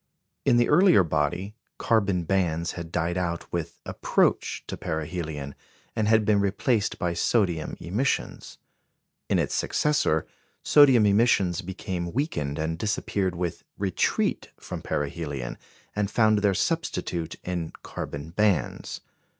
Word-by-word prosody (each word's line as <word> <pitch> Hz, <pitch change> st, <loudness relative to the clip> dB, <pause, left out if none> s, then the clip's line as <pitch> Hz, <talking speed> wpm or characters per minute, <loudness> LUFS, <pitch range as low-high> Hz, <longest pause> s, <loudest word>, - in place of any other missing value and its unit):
In 120 Hz, -, +5 dB
the 120 Hz, -, +4 dB
earlier 175 Hz, -, +6 dB
body, 85 Hz, +5 st, -1 dB, 0.2 s
carbon 100 Hz, -6 st, +1 dB
bands 85 Hz, -2 st, 0 dB
had 85 Hz, -2 st, -7 dB
died 85 Hz, +1 st, 0 dB
out 85 Hz, -1 st, -2 dB
with 85 Hz, -1 st, -3 dB
approach -, -, +1 dB
to -, -, -5 dB
perihelion, 80 Hz, -3 st, -4 dB, 0.4 s
and 110 Hz, -2 st, +1 dB
had 110 Hz, -1 st, +4 dB
been 105 Hz, -1 st, +4 dB
replaced 100 Hz, +2 st, +1 dB
by 85 Hz, -1 st, -1 dB
sodium 85 Hz, -3 st, 0 dB
emissions; 110 Hz, +10 st, -2 dB, 0.7 s
in -, -, +3 dB
its -, -, 0 dB
successor, 145 Hz, -, +1 dB, 0.4 s
sodium 135 Hz, -7 st, +6 dB
emissions 100 Hz, -3 st, +3 dB
became 90 Hz, -1 st, -4 dB
weakened 75 Hz, -, -1 dB
and 80 Hz, +1 st, -2 dB
disappeared 100 Hz, -3 st, -1 dB
with 85 Hz, -1 st, -3 dB
retreat 95 Hz, -2 st, 0 dB
from -, -, -6 dB
perihelion, 70 Hz, -4 st, -3 dB, 0.4 s
and 105 Hz, -1 st, 0 dB
found 110 Hz, -1 st, +3 dB
their 100 Hz, -2 st, +2 dB
substitute 90 Hz, -, -2 dB
in 85 Hz, -3 st, -3 dB
carbon 70 Hz, +3 st, -6 dB
bands. 95 Hz, -, 0 dB
90 Hz, 125 wpm, -26 LUFS, 80-105 Hz, 0.7 s, earlier